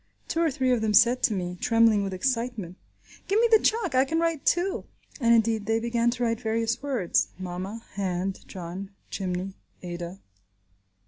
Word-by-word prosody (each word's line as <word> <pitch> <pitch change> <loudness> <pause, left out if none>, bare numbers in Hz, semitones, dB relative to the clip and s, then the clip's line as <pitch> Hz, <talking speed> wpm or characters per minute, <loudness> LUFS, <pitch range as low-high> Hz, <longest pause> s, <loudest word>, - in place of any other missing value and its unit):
Two 330 - -1
or 330 - +3
three 260 -2 0
of 245 -3 +2
them 215 -1 +1
said 240 +4 +5
to 220 - +2
me, 180 -1 -4
trembling 225 -2 +4
with 195 - -3
excitement, 230 -3 -2 0.5
"Give 400 +3 +2
me 470 - +5
the 445 - +8
chalk. 435 - +1
I 260 0 +5
can 320 +4 -1
write 330 -3 -1
too." 360 +2 +1 0.3
And 235 -3 +3
indeed 225 -2 +1
they 225 0 +2
began 235 0 +1
to 245 0 -2
write 230 -1 0
various 225 +2 -1
words: 255 -11 +1
mama, 185 +4 -6
hand, 190 -1 -2
John, 185 +1 -7 0.2
chimney, 185 0 -3 0.3
Ada. 175 +1 -6
225 Hz, 175 wpm, -26 LUFS, 190-255 Hz, 0.5 s, the